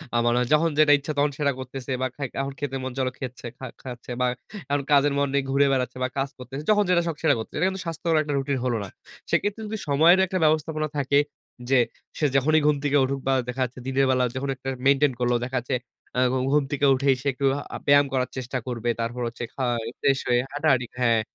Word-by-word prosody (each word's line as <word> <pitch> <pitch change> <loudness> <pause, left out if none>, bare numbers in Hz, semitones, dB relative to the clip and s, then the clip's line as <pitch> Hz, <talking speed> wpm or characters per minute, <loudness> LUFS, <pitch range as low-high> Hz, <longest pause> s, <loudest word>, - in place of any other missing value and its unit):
আ - - +4
মানা 120 +1 +3
যখন 165 +2 +4
যেটা 155 -1 +6
ইচ্ছা 145 +2 -5
তখন 145 0 +2
সেটা 145 -2 +2
করতেছে 130 0 -6
বা 130 - +1
খাই 140 -2 -3
এখন 135 0 -4
খেতে 145 -2 -3
মন 130 - -3
চলো 130 -1 +1
খেচ্ছে 130 -2 -7
খা 130 - -7 0.2
খাচ্ছে 125 -1 -8
বা - - +3 0.5
এখন 145 0 +1
কাজের 145 0 +5
মন 140 0 +2
নেই 140 -1 +2
ঘুরে 140 +1 +4
বেড়াচ্ছে 125 -1 -1
বা - - +2
কাজ 135 +1 0
করতেছে। 135 +3 -7
যখন 210 -1 +5
যেটা 175 -1 +4
শখ 165 - -2
সেটা - - +4
করতেছে। 110 - -6
এটা 185 - +3
কিন্তু 190 -1 -5
স্বাস্থ্যকর 165 0 -1
একটা 145 -1 -3
রুটিন 135 0 -1
হলো 120 -2 +1
না। 100 - -7 0.4
সেক্ষেত্রে 205 +2 0
যদি 220 +1 -4
সময়ের 160 +6 +5
একটা 185 0 -2
ব্যবস্থাপনা 155 0 +1
থাকে, 140 0 +3 0.5
যে 135 -1 +5 0.4
সে 155 - +1
যখনই 155 +4 +4
ঘুম 150 - +4
থেকে 145 0 +2
উঠুক 135 +1 -1
বা 135 - +3
দেখা 125 +1 -3
যাচ্ছে 125 +1 -9
দিনের 135 +1 +2
বেলা 130 -1 +3
যখন 135 +1 -3
একটা 130 +1 -6 0.2
মেইনটেইন 140 0 +4
করলো। 120 0 +2
দেখা 130 +1 -3
যাচ্ছে 125 +2 -2 0.4
আ - - +3
ঘু 130 - +1
ঘুম 150 0 +4
থেকে 145 0 +1
উঠেই 135 0 +2
সে 145 - -4
একটু 135 +2 -2 0.3
আ - - -2
ব্যায়াম 145 0 +6
করার 130 -1 0
চেষ্টা 130 +1 -3
করবে। 120 -1 -2
তারপর 120 +2 -3
হচ্ছে 120 +1 -6
খাই 120 -4 -1
ফ্রেশ 135 -1 +2
হয়ে 120 0 +3
হাঁটাহাঁটি, 140 -5 +1
হ্যাঁ। 115 -2 +3
135 Hz, 230 wpm, -25 LUFS, 125-145 Hz, 0.5 s, যেটা